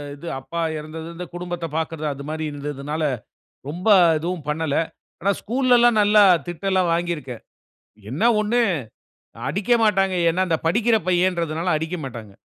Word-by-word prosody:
இது 170 Hz, +4 st, -10 dB
அப்பா 170 Hz, +5 st, -5 dB, 0.2 s
இறந்தது 160 Hz, +1 st, -8 dB
இந்த 180 Hz, -, -6 dB
குடும்பத்த 175 Hz, -1 st, -4 dB
பாக்குறது 160 Hz, -1 st, -3 dB
அது 140 Hz, 0 st, -9 dB
மாதிரி 155 Hz, 0 st, -3 dB
இருந்ததுனால, 145 Hz, +1 st, -5 dB, 0.7 s
ரொம்ப 175 Hz, +7 st, -3 dB, 0.3 s
எதுவும் 165 Hz, -2 st, -4 dB
பண்ணல. 150 Hz, -1 st, -1 dB, 0.4 s
ஆனா 195 Hz, +3 st, +2 dB
ஸ்கூல்லலாம் 240 Hz, -1 st, +3 dB
நல்லா 210 Hz, 0 st, +6 dB, 0.2 s
திட்டெல்லாம் 185 Hz, 0 st, 0 dB
வாங்கியிருக்கேன். 165 Hz, -8 st, -3 dB, 0.7 s
என்ன 140 Hz, -, -3 dB, 0.2 s
ஒண்ணு 230 Hz, +3 st, +1 dB, 0.9 s
அடிக்க 205 Hz, +5 st, -1 dB
மாட்டாங்க. 195 Hz, -3 st, +2 dB, 0.2 s
ஏன்னா, 185 Hz, +3 st, 0 dB
இந்த 160 Hz, -2 st, +1 dB
படிக்கிற 225 Hz, +6 st, +3 dB
பையன்றதுனால 175 Hz, -2 st, +1 dB
அடிக்க 160 Hz, +3 st, -3 dB
மாட்டாங்க. 115 Hz, -6 st, -8 dB
170 Hz, 130 wpm, -22 LUFS, 155-195 Hz, 0.9 s, நல்லா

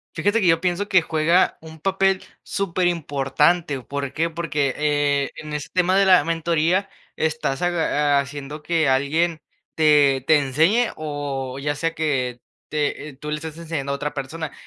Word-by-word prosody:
Fíjate 205 Hz, +8 st, +1 dB
que 185 Hz, -, +3 dB
yo 165 Hz, 0 st, +4 dB
pienso 185 Hz, +3 st, -1 dB
que 185 Hz, -4 st, +4 dB
juega 165 Hz, +3 st, +2 dB
un 160 Hz, 0 st, -12 dB
papel 195 Hz, +2 st, +1 dB, 0.2 s
superimportante. 165 Hz, -4 st, 0 dB
¿Por 140 Hz, +1 st, -4 dB
qué? 165 Hz, +3 st, 0 dB
Porque, 150 Hz, -5 st, -1 dB
eh, 145 Hz, -2 st, +1 dB
en 150 Hz, -1 st, -8 dB
ese 150 Hz, -1 st, -4 dB
tema 185 Hz, +1 st, +2 dB
de 195 Hz, -, +5 dB
la 185 Hz, -5 st, +6 dB
mentoría, 165 Hz, +3 st, +1 dB, 0.3 s
estás 160 Hz, -2 st, -1 dB
aga 150 Hz, -5 st, +2 dB
haciendo 140 Hz, +2 st, -5 dB
que 160 Hz, -2 st, +1 dB
alguien 155 Hz, +5 st, +1 dB, 0.4 s
te 145 Hz, -4 st, +4 dB
te 155 Hz, -, +5 dB
enseñe 160 Hz, -, +2 dB
o 140 Hz, -4 st, -4 dB
ya 145 Hz, +1 st, -2 dB
sea 165 Hz, +2 st, -2 dB
que 130 Hz, -6 st, -1 dB, 0.3 s
te 150 Hz, -1 st, -3 dB
tú 150 Hz, -, -5 dB
le 150 Hz, -, -1 dB
estás 160 Hz, +1 st, -7 dB
enseñando 155 Hz, -4 st, -4 dB
a -, -, 0 dB
otra 145 Hz, +1 st, -4 dB
persona. 150 Hz, +2 st, -5 dB
155 Hz, 160 wpm, -22 LUFS, 145-170 Hz, 0.4 s, la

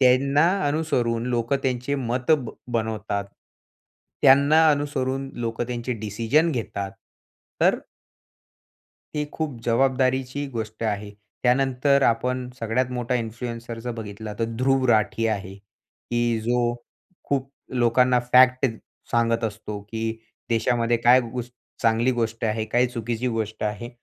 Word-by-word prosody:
त्यांना 140 Hz, +5 st, +4 dB, 0.2 s
अनुसरून 125 Hz, -7 st, 0 dB
लोकं 120 Hz, +2 st, 0 dB
त्यांचे 125 Hz, +1 st, -1 dB
मत 125 Hz, +1 st, -2 dB, 0.4 s
बनवतात. 110 Hz, -3 st, -2 dB, 1.0 s
त्यांना 145 Hz, +4 st, +6 dB
अनुसरून 135 Hz, -2 st, -1 dB
लोक 115 Hz, -1 st, -3 dB
त्यांचे 120 Hz, +1 st, -3 dB
डिसिजन 115 Hz, -, +1 dB
घेतात. 100 Hz, -5 st, -3 dB, 0.7 s
तर -, -, +4 dB, 1.4 s
ती 150 Hz, -, 0 dB
खूप 155 Hz, -6 st, -4 dB
जबाबदारीची 130 Hz, +2 st, +1 dB
गोष्ट 110 Hz, 0 st, -5 dB
आहे. 105 Hz, -1 st, -2 dB, 0.3 s
त्यानंतर 135 Hz, +2 st, +3 dB
आपण 125 Hz, +2 st, +1 dB
सगळ्यात 120 Hz, +3 st, 0 dB
मोठा 125 Hz, 0 st, -1 dB
इन्फ्लुएन्सर 115 Hz, 0 st, -5 dB
जर 120 Hz, +2 st, -4 dB
बघितला, 105 Hz, 0 st, -6 dB
तर 115 Hz, -, +2 dB
ध्रुव 135 Hz, +1 st, +2 dB
राठी 110 Hz, +1 st, +2 dB
आहे, 100 Hz, -3 st, -3 dB
की 120 Hz, +3 st, -4 dB
जो 120 Hz, 0 st, +1 dB, 0.6 s
खूप 135 Hz, -1 st, 0 dB, 0.3 s
लोकांना 125 Hz, +1 st, +4 dB
फॅक्ट 130 Hz, +1 st, +6 dB, 0.5 s
सांगत 115 Hz, 0 st, +2 dB
असतो, 105 Hz, -1 st, -4 dB
की 110 Hz, +2 st, -3 dB, 0.4 s
देशामध्ये 115 Hz, +1 st, +2 dB
काय 120 Hz, +2 st, +6 dB
गो 125 Hz, -, -2 dB, 0.4 s
चांगली 115 Hz, +2 st, +3 dB
गोष्ट 115 Hz, -2 st, -2 dB
आहे, 110 Hz, 0 st, -1 dB
काय 120 Hz, +3 st, +2 dB
चुकीची 120 Hz, 0 st, -3 dB
गोष्ट 110 Hz, -2 st, -3 dB
आहे. 105 Hz, +3 st, -3 dB
120 Hz, 115 wpm, -24 LUFS, 115-130 Hz, 1.4 s, त्यांना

